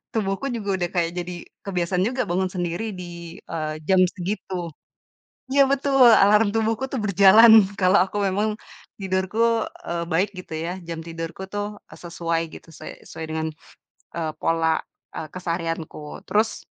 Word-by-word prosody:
tubuhku 205 Hz, +3 st, -1 dB
juga 205 Hz, -4 st, -2 dB
udah 175 Hz, -, 0 dB
kayak, 170 Hz, -1 st, +1 dB
jadi 175 Hz, 0 st, -4 dB, 0.3 s
kebiasaan 180 Hz, -1 st, 0 dB
juga, 255 Hz, +1 st, -1 dB
bangun 185 Hz, +2 st, 0 dB
sendiri 180 Hz, +4 st, -3 dB
di, 170 Hz, -1 st, -9 dB
eee, 155 Hz, -1 st, -4 dB
jam 190 Hz, -1 st, +4 dB, 0.2 s
segitu 180 Hz, -2 st, -4 dB, 0.8 s
iya 275 Hz, 0 st, +6 dB
betul! 270 Hz, -1 st, +4 dB
Alarm 210 Hz, 0 st, +6 dB
tubuhku 225 Hz, +4 st, 0 dB
tuh, 260 Hz, -, -1 dB
berjalan, 210 Hz, +2 st, +7 dB
kalau 185 Hz, -1 st, +5 dB
aku 205 Hz, -, -5 dB
memang, 205 Hz, +3 st, 0 dB, 0.5 s
tidurku, 210 Hz, +5 st, +1 dB, 0.2 s
eee, 170 Hz, 0 st, -2 dB
baik 180 Hz, +4 st, +1 dB
gitu 180 Hz, -3 st, -8 dB
ya, 165 Hz, +3 st, -3 dB
jam 165 Hz, -1 st, -5 dB
tidurku 165 Hz, +2 st, -6 dB
tuh, 205 Hz, +1 st, -3 dB, 0.2 s
eee, -, -, -12 dB
sesuai 170 Hz, -1 st, -2 dB
gitu, -, -, -13 dB
suai 155 Hz, -, -11 dB
sesuai 160 Hz, -, -8 dB
dengan, 160 Hz, 0 st, -1 dB, 0.7 s
eee, 160 Hz, -2 st, -2 dB
pola, 165 Hz, -1 st, +1 dB, 0.3 s
eee, 155 Hz, -, -5 dB
keseharianku. 165 Hz, -4 st, -5 dB
Terus, 215 Hz, +2 st, 0 dB
185 Hz, 145 wpm, -23 LUFS, 170-210 Hz, 0.8 s, berjalan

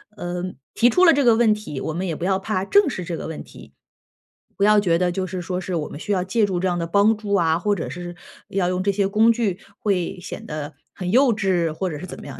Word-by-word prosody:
呃， 175 Hz, -1 st, -4 dB, 0.3 s
提 240 Hz, -, +4 dB
出 360 Hz, +9 st, +3 dB
了 335 Hz, -, +8 dB
这 285 Hz, -2 st, +2 dB
个 235 Hz, -2 st, +6 dB
问 225 Hz, -2 st, +4 dB
题， 210 Hz, -10 st, -6 dB
我 160 Hz, -, -3 dB
们 185 Hz, +3 st, -3 dB
也 165 Hz, -, -2 dB
不 170 Hz, -, -7 dB
要 190 Hz, 0 st, +1 dB
怕 190 Hz, -1 st, -2 dB
正 405 Hz, -, +4 dB
视 185 Hz, -, -4 dB
这 170 Hz, -1 st, -4 dB
个 -, -, -6 dB
问 160 Hz, -, -6 dB
题。 -, -, -15 dB, 0.8 s
不 200 Hz, -, -1 dB
要 210 Hz, 0 st, +6 dB
觉 170 Hz, -4 st, +2 dB
得 180 Hz, -1 st, +1 dB
就 185 Hz, +1 st, -2 dB
是 180 Hz, 0 st, -5 dB
说 180 Hz, +1 st, -3 dB
是 185 Hz, -1 st, -4 dB
我 155 Hz, -3 st, -3 dB
们 145 Hz, -, -8 dB
需 205 Hz, -, -4 dB
要 185 Hz, -2 st, +1 dB
借 205 Hz, +3 st, +1 dB
助 185 Hz, -3 st, -2 dB
这 190 Hz, -, 0 dB
样 175 Hz, -, 0 dB
的 165 Hz, -, -1 dB
帮 205 Hz, +4 st, +3 dB
助 205 Hz, -2 st, -4 dB
啊， 165 Hz, -4 st, +3 dB
或 205 Hz, +3 st, +1 dB
者 170 Hz, -, -4 dB
是 175 Hz, 0 st, -7 dB, 0.3 s
要 185 Hz, -2 st, 0 dB
用 185 Hz, 0 st, -1 dB
这 200 Hz, -, +2 dB
些 195 Hz, 0 st, +1 dB
工 220 Hz, +3 st, +4 dB
具， 215 Hz, -6 st, -1 dB, 0.2 s
会 185 Hz, -3 st, -1 dB
显 -, -, -8 dB
得 150 Hz, 0 st, -6 dB, 0.2 s
很 180 Hz, -1 st, -5 dB
幼 255 Hz, +2 st, +4 dB
稚 175 Hz, -6 st, 0 dB
或 185 Hz, +3 st, -2 dB
者 150 Hz, -, -5 dB
是 180 Hz, -, -7 dB
怎 -, -, -9 dB
么 -, -, -10 dB
样。 140 Hz, -, -9 dB
185 Hz, 295 characters per minute, -22 LUFS, 175-210 Hz, 0.8 s, 了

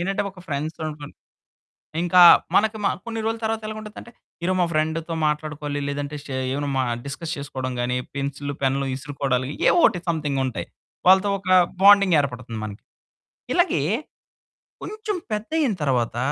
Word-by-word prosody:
ఏంటంటే, 195 Hz, +3 st, -1 dB
ఒక 190 Hz, -, -18 dB
ఫ్రెండ్స్‌ 155 Hz, +3 st, -3 dB
అనుకుని. 150 Hz, -1 st, -8 dB, 0.9 s
ఇంకా 175 Hz, 0 st, +5 dB, 0.3 s
మనకి 220 Hz, +1 st, +3 dB
మ -, -, +4 dB, 0.2 s
కొన్ని 225 Hz, -1 st, -4 dB
రోలు 225 Hz, 0 st, -1 dB
తర్వాత 220 Hz, 0 st, -1 dB
ఎలగుండుద్దంటే, 215 Hz, +2 st, -8 dB, 0.3 s
ఈరోజు 185 Hz, +1 st, +1 dB
మా 175 Hz, -, +3 dB
ఫ్రెండ్‌తో 160 Hz, +2 st, -1 dB
మాట్లాడుకోవాలి, 150 Hz, -1 st, -2 dB
లేదంటే 145 Hz, +1 st, -4 dB
షే 135 Hz, -, -6 dB, 0.2 s
ఏమైనా 145 Hz, +1 st, -2 dB
మ -, -, +2 dB, 0.3 s
డిస్కస్ 160 Hz, +4 st, -5 dB
చేసుకోవడం 130 Hz, -2 st, -4 dB
గాని, 125 Hz, +1 st, 0 dB, 0.2 s
పెన్సిల్లు, 140 Hz, +1 st, -4 dB
పెన్నులు 135 Hz, +1 st, +1 dB
ఇసురుకోడాలు 135 Hz, -2 st, -2 dB, 0.2 s
ఏవో -, -, +4 dB
ఒకటి 190 Hz, -6 st, 0 dB
సంథింగుంటాయి. 140 Hz, -6 st, -1 dB, 0.4 s
వాళ్ళతో 190 Hz, +2 st, +6 dB
ఒక 190 Hz, -1 st, -9 dB, 0.3 s
బాండింగ్ 200 Hz, -2 st, +7 dB
ఏర్పడుతుంది 125 Hz, -4 st, -4 dB
మనకి. 105 Hz, 0 st, -8 dB, 0.7 s
ఇలాగే 350 Hz, -, +2 dB, 1.0 s
కొంచెం 430 Hz, -1 st, -4 dB, 0.2 s
పెద్దయింతర్వాత, 200 Hz, -, 0 dB
155 Hz, 130 wpm, -23 LUFS, 140-200 Hz, 1.0 s, బాండింగ్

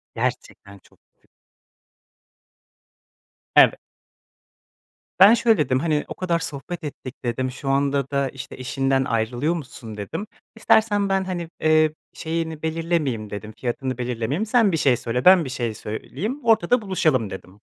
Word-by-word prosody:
gerçekten 100 Hz, 0 st, -4 dB
çok -, -, -26 dB, 0.2 s
düş -, -, -35 dB, 2.3 s
Evet. -, -, +7 dB, 1.4 s
Ben 200 Hz, +4 st, +9 dB
şöyle 230 Hz, -3 st, +3 dB
dedim, 130 Hz, -4 st, +1 dB
"Hani, 150 Hz, 0 st, 0 dB
o -, -, -6 dB
kadar 175 Hz, -2 st, 0 dB
sohbet 165 Hz, +2 st, -6 dB
ettik." 135 Hz, -3 st, -7 dB
dedim, 130 Hz, +2 st, -1 dB
"Şu 135 Hz, +2 st, -7 dB
anda 140 Hz, 0 st, +1 dB
da, 140 Hz, -1 st, 0 dB
işte, 135 Hz, +1 st, -9 dB
eşinden 135 Hz, +1 st, 0 dB
ayrılıyormuşsun." 120 Hz, 0 st, -3 dB
dedim. 105 Hz, -, -5 dB, 0.3 s
"İstersen 210 Hz, -2 st, +3 dB
ben, 195 Hz, 0 st, +1 dB
hani, 175 Hz, -3 st, -4 dB
eee, 155 Hz, -1 st, +3 dB, 0.2 s
şeyini 160 Hz, -1 st, -4 dB
belirlemeyeyim." 160 Hz, -9 st, -1 dB
dedim, 105 Hz, +1 st, -7 dB
"Fiyatını 130 Hz, 0 st, -3 dB
belirlemeyeyim. 125 Hz, -, -2 dB
Sen 220 Hz, -3 st, +3 dB
bir -, -, +1 dB
şey 135 Hz, -5 st, +3 dB
söyle, 125 Hz, +1 st, -3 dB
ben 185 Hz, -2 st, +7 dB
bir 135 Hz, -, -6 dB
şey 120 Hz, -4 st, -3 dB
söyleyeyim, 150 Hz, -, -5 dB
ortada 225 Hz, +1 st, +3 dB
buluşalım." 155 Hz, -, +1 dB
dedim. 95 Hz, +1 st, -10 dB
145 Hz, 135 wpm, -23 LUFS, 125-175 Hz, 2.3 s, Ben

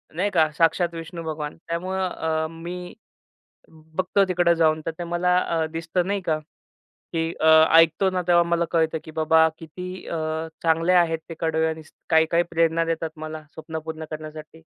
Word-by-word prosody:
नाही 190 Hz, +5 st, +1 dB
का, 155 Hz, -1 st, +4 dB
साक्षात 170 Hz, +1 st, +2 dB
विष्णू 165 Hz, +1 st, -7 dB
भगवान. 155 Hz, -2 st, -5 dB
त्यामुळं 185 Hz, +3 st, -2 dB
अ 160 Hz, -2 st, -2 dB
मी 175 Hz, +2 st, -7 dB, 0.8 s
बघतो 160 Hz, +5 st, -1 dB
तिकडं 175 Hz, -1 st, +3 dB
जाऊन 160 Hz, -1 st, +2 dB
तर -, -, 0 dB
ते 175 Hz, -, -3 dB
मला 175 Hz, +1 st, +1 dB
अ, 165 Hz, -3 st, 0 dB
दिसतं 165 Hz, +2 st, -1 dB
नाही 200 Hz, +1 st, -1 dB
का, 160 Hz, -3 st, 0 dB, 0.7 s
की 165 Hz, -1 st, -1 dB
अ, -, -, +2 dB, 0.3 s
ऐकतो 165 Hz, +4 st, +4 dB
ना 185 Hz, -1 st, -1 dB
तेव्हा 175 Hz, -1 st, +6 dB
मला 170 Hz, 0 st, +1 dB
कळतं 160 Hz, -1 st, +1 dB
की -, -, -9 dB
बाबा 160 Hz, +1 st, +5 dB
किती 180 Hz, +3 st, -8 dB
अ 165 Hz, -, -3 dB, 0.4 s
चांगले 165 Hz, +2 st, +2 dB
आहेत 170 Hz, -2 st, +3 dB
ते 165 Hz, -, -6 dB
कडवे 160 Hz, -1 st, +1 dB
आणि 160 Hz, 0 st, -5 dB, 0.3 s
काही-काही 160 Hz, +1 st, +4 dB
प्रेरणा 165 Hz, 0 st, +2 dB
देतात 165 Hz, -1 st, -2 dB
मला 155 Hz, 0 st, -6 dB
स्वप्न 160 Hz, 0 st, -6 dB
पूर्ण 160 Hz, 0 st, -5 dB
करण्यासाठी. 155 Hz, +1 st, -9 dB
165 Hz, 165 wpm, -24 LUFS, 160-175 Hz, 0.8 s, तेव्हा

